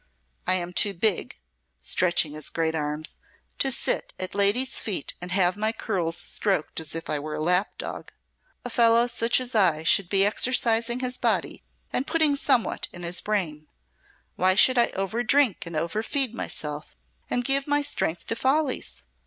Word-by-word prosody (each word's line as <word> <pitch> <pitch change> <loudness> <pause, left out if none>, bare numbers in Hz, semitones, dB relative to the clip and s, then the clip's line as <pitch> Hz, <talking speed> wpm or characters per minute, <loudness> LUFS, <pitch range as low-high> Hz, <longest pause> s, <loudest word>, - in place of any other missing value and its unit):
I 185 - +4
am 175 -1 -3
too 200 +2 +4
big," 190 - 0 0.4
stretching 155 - +1
his 155 -1 -1
great 160 -1 -1
arms, 150 0 -3 0.4
"to 270 - +2
sit - - 0
at 185 - -4
ladies' 205 +7 +2
feet 195 -9 -3
and 180 0 -5
have 185 -1 +2
my 215 +1 0
curls 180 -7 -2
stroked 190 -3 -1
as 160 -1 -4
if 165 - -4
I 150 - -2
were 150 +1 -5
a - - -5
lap 180 +5 0
dog. - - -7 0.5
A 245 - -5
fellow 230 0 +4
such 240 0 +2
as 255 -1 -6
I 170 -8 +3
should 175 +2 +3
be 195 0 +4
exercising 235 +2 +2
his 250 0 -2
body - - -1 0.3
and 265 - -1
putting 315 -3 +2
somewhat 250 -4 +1
in 175 - -9
his 175 +1 0
brain. 160 -8 -3 0.7
Why 185 +1 +3
should 255 +4 +5
I 235 - +3
overdrink 225 +2 +1
and 170 - -7
overfeed 215 - -1
myself 150 - -6 0.3
and 245 0 -1
give 275 +2 +1
my 290 0 +1
strength 175 - -2
to 225 - -1
follies? 260 - -1
200 Hz, 170 wpm, -25 LUFS, 165-240 Hz, 0.7 s, should